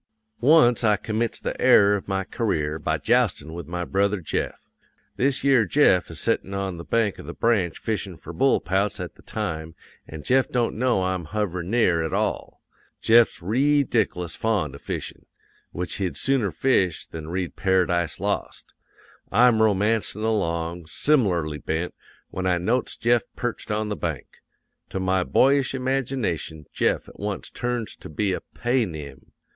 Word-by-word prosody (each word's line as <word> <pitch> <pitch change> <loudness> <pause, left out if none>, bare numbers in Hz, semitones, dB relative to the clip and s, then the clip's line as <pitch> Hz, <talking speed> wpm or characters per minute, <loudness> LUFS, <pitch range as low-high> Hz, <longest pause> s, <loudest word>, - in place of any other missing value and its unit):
"'Once 125 -4 +5
I 105 -2 +4
commits 110 +2 -2
the - - -4
error 100 0 +6
of 100 - -5
my 95 -1 -1
career 80 -9 -2
by 80 0 -1
joustin' 115 -7 +1
with 85 -3 -7
my 90 +1 -3
brother 100 +2 +1
Jeff. 80 - -4 0.5
This 135 +1 +1
yere 135 -4 +5
Jeff 110 -10 +3
is 80 -2 -7
settin' 100 - -1
on 95 -2 -3
the 85 - -7
bank 110 -1 0
of - - -10
the 85 - -7
Branch 100 -8 +1
fishin' 100 -5 -3
for 85 - -10
bullpouts 100 -2 +1
at - - -5
the - - -20
time, 80 0 -4 0.3
an' 80 -1 -8
Jeff 130 +1 +2
don't 120 -2 0
know 120 -4 +1
I'm 95 -2 -2
hoverin' 90 -2 -3
near 100 -8 +3
at 80 - -3
all. - - -2 0.4
Jeff's 115 -5 +4
reedic'lous 115 - +1
fond 100 -11 0
of 70 - -11
fishin'; - - -6 0.4
which 90 0 -3
he'd 95 -3 -2
sooner 135 -7 +1
fish 90 - +1
than 80 -1 -8
read 90 -3 -3
Paradise 90 -4 +1
Lost. - - -3 0.6
I'm 115 +1 +5
romancin' 105 0 +1
along, 85 -6 -1
sim'larly 85 - +1
bent, 80 +3 -2 0.4
when 95 0 -2
I 90 -1 +2
notes 115 +9 -1
Jeff 120 0 +2
perched 120 -2 -4
on 105 0 -1
the 105 - -2
bank. 80 -8 -5 0.5
To 95 - -3
my 95 0 +1
boyish 135 +5 +3
imagination 125 - -2
Jeff - - 0
at - - -15
once 100 -1 -4
turns 120 -2 -3
to - - -11
be 95 +5 -1
a - - -3
Paynim. 100 - -2
100 Hz, 160 wpm, -24 LUFS, 85-120 Hz, 0.6 s, error